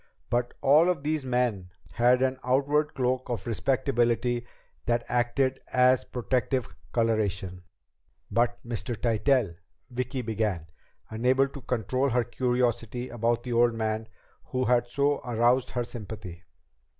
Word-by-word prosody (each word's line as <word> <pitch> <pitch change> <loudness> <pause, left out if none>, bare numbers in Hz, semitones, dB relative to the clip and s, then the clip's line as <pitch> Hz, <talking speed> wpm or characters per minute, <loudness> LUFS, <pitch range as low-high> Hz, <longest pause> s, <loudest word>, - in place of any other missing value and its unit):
But 120 0 0
all 155 +6 +5
of 165 -6 -1
these 155 -1 -1
men 125 -8 0 0.2
had 125 +2 +3
an 130 0 0
outward 140 +4 +1
cloak 130 0 -1
of 115 -6 -3
respectability 120 -1 0 0.4
that 120 0 +1
acted 125 +2 +1
as 125 0 +4
protective 125 0 -1 0.2
coloration." 105 -5 0 0.7
"But 120 0 +2
Mr. 120 -1 -3
Tytell?" 120 -3 +2 0.4
Vicki 125 +1 -3
began, 105 -7 -1 0.5
unable 130 +4 +2
to 140 - -10
control 130 +3 0
her 125 -1 +2
curiosity 125 0 -1
about 120 0 0
the 125 - -3
old 120 0 +3
man 110 0 -2 0.4
who 130 -2 -1
had 120 -1 +3
so 140 +3 +1
aroused 120 +1 +2
her 125 - -2
sympathy. 105 -6 -8
120 Hz, 125 wpm, -27 LUFS, 115-130 Hz, 0.7 s, all